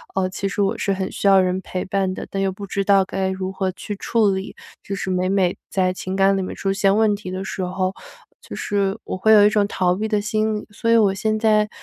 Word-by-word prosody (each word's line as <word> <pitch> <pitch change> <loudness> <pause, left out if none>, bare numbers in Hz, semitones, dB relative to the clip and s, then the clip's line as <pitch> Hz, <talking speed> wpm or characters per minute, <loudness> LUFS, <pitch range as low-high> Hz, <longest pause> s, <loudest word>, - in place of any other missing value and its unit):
呃， 185 -1 +1
其 195 +1 -3
实 205 - -2
我 200 +3 +1
是 195 - 0
很 190 0 -3
需 - - -6
要 195 -1 +7
人 185 0 0
陪 185 -1 -4
伴 190 -1 -1
的， - - -7
但 195 - -3
又 190 - +1
不 200 +1 -8
知 200 0 -1
道 195 -1 +4
该 190 0 -2
如 190 0 -3
何 190 -1 -1
去 205 +3 -6
处 215 0 +1
理。 190 0 -4 0.3
就 200 - -4
是 195 - -4
每 185 0 0
每 190 -2 +1 0.2
在 185 -1 +1
情 185 0 -5
感 195 0 +3
里 - - -1
面 - - -5
出 195 0 -1
现 195 0 +2
问 215 -1 +3
题 185 -3 -7
的 190 +1 -4
时 190 +1 -5
候， 185 +1 -2 0.5
就 - - -11
是 200 0 -1
我 - - -4
会 220 +4 +3
有 205 -1 +8
一 - - +6
种 210 -1 +2
逃 180 -1 +1
避 215 +3 -3
的 210 -2 +1
心 215 +1 0
理， - - -12
所 230 +3 -1
以 230 - +6
我 200 -3 +4
现 215 +2 -1
在 215 -1 +3
195 Hz, 285 characters per minute, -21 LUFS, 190-205 Hz, 0.5 s, 有